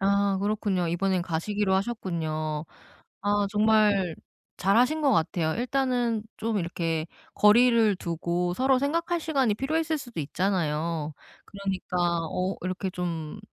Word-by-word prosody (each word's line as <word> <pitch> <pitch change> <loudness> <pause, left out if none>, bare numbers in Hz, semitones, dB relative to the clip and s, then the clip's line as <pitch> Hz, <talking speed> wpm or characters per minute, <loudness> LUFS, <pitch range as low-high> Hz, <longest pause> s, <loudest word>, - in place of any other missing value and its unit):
아 200 0 +2
그렇군요. 200 -4 0
이번엔 185 +2 0
가시기로 190 +4 -1
하셨군요. 160 -7 -2 0.6
아 205 0 +1
정말 210 -4 +3 0.4
잘하신 245 +11 +3
것 280 -2 +4
같아요. 160 -3 +1
일단은 245 -2 0
좀 225 -1 -1
이렇게 165 -2 -2 0.3
거리를 225 0 +5
두고 175 +1 -2
서로 260 +4 +3
생각할 335 +5 0
시간이 275 -9 +1
필요했을 315 +6 -1
수도 240 - -6
있잖아요. 160 -2 -1 0.3
그러니까 195 -2 -4 0.3
어 185 +1 -1
이렇게 185 +1 -3
좀 170 -1 -4
200 Hz, 290 characters per minute, -27 LUFS, 175-230 Hz, 0.6 s, 거리를